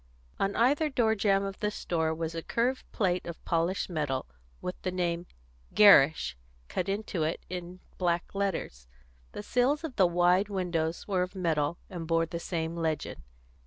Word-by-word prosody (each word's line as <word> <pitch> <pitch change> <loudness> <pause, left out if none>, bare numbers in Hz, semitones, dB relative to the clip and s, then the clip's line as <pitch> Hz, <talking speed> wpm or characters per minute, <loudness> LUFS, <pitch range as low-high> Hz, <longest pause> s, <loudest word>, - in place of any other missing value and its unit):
On 195 +1 0
either 285 +6 +3
door 235 -5 +2
jamb 200 -2 +2
of 195 0 -5
the 210 - 0
store 165 -6 -1
was 160 0 -3
a 165 - -3
curved 245 +8 -1
plate 185 -3 0
of 170 - -8
polished 170 +3 0
metal, 150 -6 -2 0.3
with 180 - -4
the 185 - -1
name 175 -1 -1 0.5
GERRISH 150 - +6 0.3
cut 185 - -2
into 200 -3 -2
it 155 +2 -2
in 180 0 -6 0.2
black 175 -2 0
letters; 185 - -3 0.5
the - - -6
sills 260 +8 +1
of 305 -6 -6
the 190 -3 +6
wide 180 +3 +3
windows 175 -4 -2
were 190 -3 +1
of 180 +2 -3
metal, 165 -3 0
and 175 -4 -6
bore 165 0 +2
the 170 +1 -5
same 165 -1 -3
legend. 160 -2 -2
180 Hz, 165 wpm, -29 LUFS, 165-200 Hz, 0.5 s, GERRISH